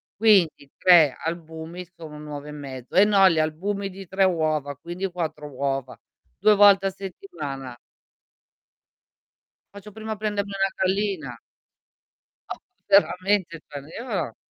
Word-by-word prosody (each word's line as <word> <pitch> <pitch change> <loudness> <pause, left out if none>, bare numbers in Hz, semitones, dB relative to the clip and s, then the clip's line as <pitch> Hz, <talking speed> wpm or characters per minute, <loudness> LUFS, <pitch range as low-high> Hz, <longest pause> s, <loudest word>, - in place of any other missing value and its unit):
Quindi 190 -9 +3
3 165 -7 +6
albumi 165 +1 -6
sono 155 -3 -10
1 150 - -10
uovo 145 -1 -7
e 150 - -7
mezzo 135 -4 -9
e 195 - +7
no 200 -2 +6
gli 165 -2 +1
albumi 195 +6 -2
di 190 -1 -10
3 190 +1 +1
uova, 155 -5 0
quindi 175 +6 -5
4 160 -4 -4
uova. 135 -1 -3 0.4
2 210 +2 +5
volte 200 -1 +6
a - - +1
settimana". 155 -9 -7 2.0
"Faccio 200 +1 -11
prima 220 +1 -7
a 220 - -1
prendermi 205 -1 -3
una 195 0 +1 0.2
gallina". 185 - -3 1.2
Oh, - - -12 0.3
veramente 185 -1 +2
cioè 145 -1 -7 0.2
io 220 - -3
175 Hz, 130 wpm, -24 LUFS, 150-195 Hz, 2.0 s, e